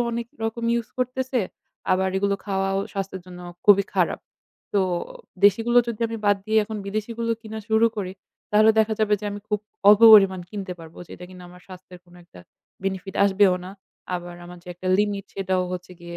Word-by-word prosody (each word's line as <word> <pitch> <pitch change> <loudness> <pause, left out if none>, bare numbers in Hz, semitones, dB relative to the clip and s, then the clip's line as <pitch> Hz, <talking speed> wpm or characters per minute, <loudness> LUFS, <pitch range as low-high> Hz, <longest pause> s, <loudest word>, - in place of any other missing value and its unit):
অনেক 235 0 -3 0.2
রকম 230 +1 -3
ইউজ 235 -1 -1
করতেছে, 255 0 -1 0.5
আবার 190 0 +1
এগুলো 200 0 +1
খাওয়াও 195 -1 -1
স্বাস্থ্যের 195 -2 -5
জন্য 180 -1 -11 0.2
খুবই 200 -1 +6
খারাপ। - - +1 0.5
তো 200 - +4 0.6
দেশিগুলো 225 +4 +4
যদি 230 -2 -5
আমি 225 - -4
বাদ 205 -1 +4
দিয়ে 220 0 +3
এখন 220 0 -6
বিদেশিগুলো 230 +3 -3
কিনা 220 0 -7
শুরু 220 +1 +4
করি 185 -2 -4 0.4
তাহলে 215 +1 +5
দেখা 220 0 +3
যাবে 210 -1 +3
যে - - -8
আমি 205 0 -6
খুব 210 -1 0 0.3
অল্পপরিমাণ 205 -3 +8
কিনতে 195 -3 -5
পারবো 160 0 -13
যেটা 180 - -10
কিনা 180 -1 -12
আমার 180 0 -16
স্বাস্থ্যের 185 -1 -12
কোনো 175 0 -19
একটা 125 - -16 0.4
বেনিফিট 190 0 -4
আসবেও 195 -1 +4
না। 185 - -8 0.4
আবার 175 0 -6
আমার 175 0 -11
যে 180 - -15
একটা 185 +1 -5
লিমিট 205 -1 0
সেটাও 190 -1 -1
হচ্ছে 180 0 -7
গিয়ে 170 0 -8
200 Hz, 180 wpm, -23 LUFS, 185-220 Hz, 0.6 s, অল্পপরিমাণ